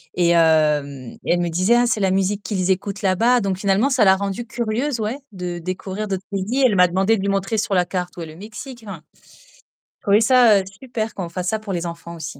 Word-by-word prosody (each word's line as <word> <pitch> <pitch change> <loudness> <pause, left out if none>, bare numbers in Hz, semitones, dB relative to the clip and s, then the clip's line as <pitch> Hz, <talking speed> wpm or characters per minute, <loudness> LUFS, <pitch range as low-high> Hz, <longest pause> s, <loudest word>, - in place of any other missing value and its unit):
et 175 -1 +2
hem, 150 -6 +2
et - - -1
elle 175 - +1
me 175 -1 -1
disait: 185 +8 +2
«Ah 240 - +3
c'est 225 -2 0
la 190 -1 +2
musique 195 +2 0
qu'ils 190 -3 -2
écoutent 195 +1 -2
là-bas». 225 +6 +3
Donc 195 -2 -1
finalement 200 +6 +2
ça 255 -5 +3
l'a 190 -2 +6
rendue 200 +4 -4
curieuse 235 +3 -2
ouais 220 +6 -3
de 180 -3 -5
découvrir 185 +4 -5
d'autres 190 -1 -4
pays. 205 +8 -1
Elle 225 -5 +3
m'a 180 -1 +6
demandé 190 +5 +2
de - - -4
lui 200 - -1
montrer 195 +2 -1
sur 205 -1 -1
la 180 -1 +3
carte 180 -1 -4
où - - -6
est - - -5
le 155 0 -11
Mexique, 225 - -10
enfin. 185 -6 -8 0.8
J'ai - - -82
trouvé 205 +1 +3
ça, 235 -3 +5
heu, - - -3 0.2
super 230 -4 -4
qu'on 185 -3 -5
fasse 180 +1 -3
ça 220 - -1
pour 210 -2 -6
les 175 -1 -3
enfants 170 0 -7
aussi. 160 0 -8
195 Hz, 240 wpm, -21 LUFS, 180-220 Hz, 0.8 s, l'a